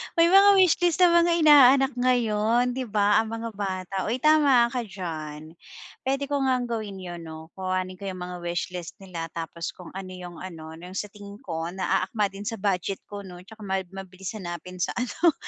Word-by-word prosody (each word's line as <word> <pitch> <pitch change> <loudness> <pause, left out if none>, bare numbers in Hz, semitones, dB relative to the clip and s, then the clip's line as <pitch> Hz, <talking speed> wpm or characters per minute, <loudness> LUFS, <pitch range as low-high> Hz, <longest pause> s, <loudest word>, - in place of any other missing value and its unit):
May 335 -1 +5
mga 400 +1 +8
wishlist 355 -2 +3
ang 355 -1 +7
mga 340 0 +4
inaanak 275 -3 +7
ngayon, 240 -1 +2
'di 255 +1 -3
ba, 205 -1 +3
ang 225 0 -2
mga 230 0 -4
bata. 190 -2 -4
Uy, 240 +4 -2
tama 285 -6 +5
ka 245 -1 -3
diyan. 160 -4 -7 0.5
Puwede 270 +1 0
ko 285 - +1
ngang 255 -2 0
gawin 210 -4 -4
'yon 175 -2 -7
'no. 160 0 -9
Kuhanin 185 0 -2
ko 200 - -9
'yong 185 -2 -5
mga 180 0 -5
wishlist 175 0 -4
nila 175 -4 -5
tapos 165 0 -5
kung 180 - -12
ano 190 0 -7
'yong 180 -2 -9
ano, 165 -4 -8
'yong 180 +2 -10
sa 210 - -3
tingin 205 0 -12
ko 165 -2 -4
naaakma 195 +2 0
din 195 +1 -9
sa 225 -2 -4
budget 195 -1 -1
ko 205 -1 -7
'no 180 -1 -10
tsaka 215 +3 -12
ma 190 0 0
mabilis 190 -1 -8
hanapinn 180 -1 -7
sa 180 - -1
ano, 310 +7 +2
200 Hz, 190 wpm, -26 LUFS, 180-245 Hz, 0.5 s, mga